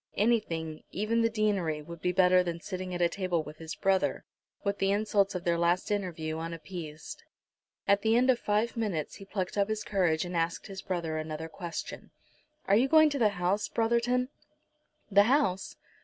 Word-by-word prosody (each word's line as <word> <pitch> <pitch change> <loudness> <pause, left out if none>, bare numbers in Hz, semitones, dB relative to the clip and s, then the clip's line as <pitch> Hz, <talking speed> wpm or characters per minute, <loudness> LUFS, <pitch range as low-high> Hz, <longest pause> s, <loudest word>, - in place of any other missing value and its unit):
Anything, 170 -8 0
even 220 +3 0
the 230 - +3
deanery, 200 -9 0
would 170 +1 -10
be 180 - +1
better 180 0 +5
than 170 -2 -3
sitting 185 +1 -5
at 175 -1 +1
table 180 -4 -1
with 150 +1 -11
his 160 0 -6
brother, 195 -1 +1 0.4
with 200 -1 -1
the 195 - +2
insults 200 -1 +1
of 180 - -3
their 170 -1 +1
last 175 +4 +1
interview 165 -6 -2
unappeased. 165 -1 -7 0.6
At 200 0 +4
the 220 +1 +3
end 255 +2 +5
of 245 - 0
five 210 +3 0
minutes 200 -10 -2
he 195 - -11
plucked 195 0 -3
up 200 +1 +2
his 215 -1 -2
courage, 180 -6 +1
and 175 0 -5
asked 165 0 -1
his 195 -1 -7
brother 170 -5 -2
another 155 +1 -5
question. 170 +1 -7 0.6
"Are 195 - +4
you 245 +5 +4
going 310 +1 +6
to 280 - -2
the 220 -3 +5
house, 185 +4 +1
Brotherton?" 235 +2 +1 0.8
"The 200 +1 +6
house! 260 -10 +1
190 Hz, 180 wpm, -29 LUFS, 170-215 Hz, 0.8 s, going